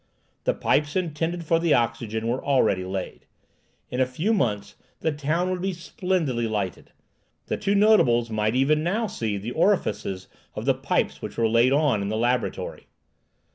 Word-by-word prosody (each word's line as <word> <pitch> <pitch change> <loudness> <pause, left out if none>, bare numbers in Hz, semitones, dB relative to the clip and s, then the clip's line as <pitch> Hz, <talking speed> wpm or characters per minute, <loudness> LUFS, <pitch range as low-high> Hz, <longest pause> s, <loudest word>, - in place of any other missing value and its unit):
The - - +2
pipes 145 0 +1
intended 170 -1 -2
for 165 +1 +2
the 165 -2 +3
oxygen 115 -1 -1
were 120 +3 -1
already 110 -9 +2
laid. 95 0 -6 0.6
In 125 - -2
a 130 - +3
few 160 - 0
months 105 - -1 0.3
the 160 - +1
town 155 +5 -1
would 180 -1 -2
be 190 0 -1
splendidly 170 - -1
lighted. 105 -4 -3 0.5
The - - -2
two 205 0 0
notables 125 - +4
might 110 +1 0
even 145 +4 +3
now 200 +8 0
see 110 - -3
the 105 +5 -5
orifices 105 - 0 0.3
of - - -5
the - - +4
pipes - - -1
which - - -7
were 115 -1 +3
laid 115 +3 +4
on 140 -7 +2
in 100 - -2
the 110 - -1
laboratory. 120 +2 -1
130 Hz, 170 wpm, -25 LUFS, 110-170 Hz, 0.6 s, notables